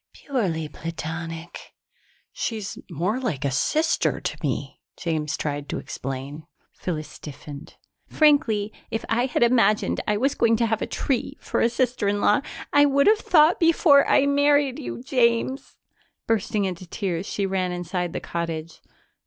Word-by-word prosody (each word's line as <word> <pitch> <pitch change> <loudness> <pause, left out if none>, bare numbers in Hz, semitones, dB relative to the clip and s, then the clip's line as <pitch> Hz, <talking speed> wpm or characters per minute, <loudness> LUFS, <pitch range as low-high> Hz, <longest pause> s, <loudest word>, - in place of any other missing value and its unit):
"Purely 185 - -2
platonic." 165 +1 -7 0.6
"She's 220 - -4
more 180 - -1
like 175 - -2
a 140 - +1
sister 310 - +1
to - - -4
me," - - -3 0.2
James 155 -3 -2
tried 145 -1 -3
to - - -2
explain. 135 +4 -6 0.3
Phyllis 155 -4 -4
stiffened. 145 0 -10 0.3
"Frankly, 260 -9 +3 0.2
if 225 - -3
I 240 +3 +2
had 250 - +1
imagined 230 -4 +3
I 210 - +2
was 270 +5 +1
going 230 -3 +3
to 230 +1 +1
have 220 -1 -1
a - - -1
tree 260 -4 -2
for - - -2
a 230 - +4
sister 245 -3 0
in 205 0 +1
law, 205 +3 +3 0.3
I 290 0 +6
would 280 0 +3
have 425 0 +5
thought 320 -4 +4
before 325 -4 +5
I 280 - +5
married 285 -1 +3
you, 250 -3 -6
James." 250 0 0 0.5
Bursting 215 -2 0
into 185 -1 -5
tears, 180 -1 -3
she 200 - -1
ran 190 -1 -1
inside 175 0 -3
the - - -3
cottage. 165 -1 -5
210 Hz, 155 wpm, -24 LUFS, 165-260 Hz, 0.6 s, I